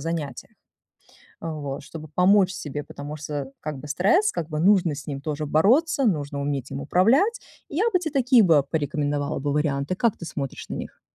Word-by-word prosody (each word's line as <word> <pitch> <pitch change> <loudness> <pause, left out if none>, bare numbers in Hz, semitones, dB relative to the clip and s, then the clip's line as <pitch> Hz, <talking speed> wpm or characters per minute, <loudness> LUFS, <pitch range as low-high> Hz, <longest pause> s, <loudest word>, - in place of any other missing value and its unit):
занятья. 160 -2 -4 0.9
Вот, 150 -4 -5
чтобы 155 +2 -9
помочь 190 +1 +5
себе, 145 -3 -5
потому 145 +1 -8
что 145 -2 -5
как 150 -2 -4
бы 145 - -9
стресс, 345 - +3
как 160 - -4
бы 150 - -3
нужно 180 -2 +4
с 145 - -9
ним 140 -2 -4
тоже 150 +1 -3
бороться, 260 - +3
нужно 145 -8 0
уметь 140 -2 -3
им 135 - -4
управлять. 245 - +3 0.3
Я 320 +8 0
бы 365 - +4
тебе 315 -4 -4
такие 255 -4 +5
бы 160 -6 +5
порекомендовала 145 -1 -1
бы 145 +1 -2
варианты. 145 +2 0
Как 230 +2 +1
ты 170 - -8
смотришь 140 -4 -5
на - - -4
них? - - -8
155 Hz, 185 wpm, -24 LUFS, 145-200 Hz, 0.9 s, помочь